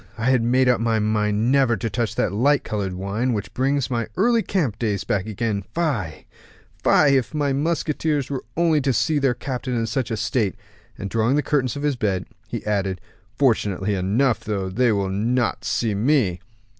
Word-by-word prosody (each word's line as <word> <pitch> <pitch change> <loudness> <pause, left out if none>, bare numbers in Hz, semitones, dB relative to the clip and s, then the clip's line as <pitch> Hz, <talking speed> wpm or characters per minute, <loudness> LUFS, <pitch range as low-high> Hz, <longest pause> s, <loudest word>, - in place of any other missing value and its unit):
_ - - -22
I 115 +3 +1
had 125 -2 +3
made 125 +3 +3
up 125 -2 +3
my 115 -1 +1
mind 105 +2 +1
never 135 -4 +3
to 105 - -3
touch 115 0 -2
that - - 0
light 140 +7 +3
colored 100 -4 -3
wine, 100 +7 -1
which 105 -3 -4
brings 135 0 0
my 115 -2 -1
early 230 +3 +3
camp 155 - -1
days 105 -4 -1
back 100 0 -1
again. 110 -1 -2
Fie! 120 - -2 0.6
fie! 150 - +5
if 125 0 -2
my 145 -2 +1
musketeers 150 -1 0
were 135 -2 -4
only 165 -3 +3
to 135 -1 +1
see 150 +4 +1
their 135 -3 +2
captain 125 0 -4
in 115 -1 0
such 115 +2 -2
a 110 - -2
state." 105 -3 0 0.4
And 100 - -4
drawing 115 +5 +1
the 150 - +1
curtains 135 -4 0
of 145 - -5
his 145 -3 0
bed, 100 -6 -1 0.2
he - - -5
added, 95 -3 -1 0.4
"Fortunately 105 -6 +1
enough, 105 +6 +1
though, 100 -3 -2
they 120 +5 +2
will 100 -2 0
not 115 +2 0
see 115 -1 0
me." 105 - +1
115 Hz, 195 wpm, -22 LUFS, 105-135 Hz, 0.6 s, fie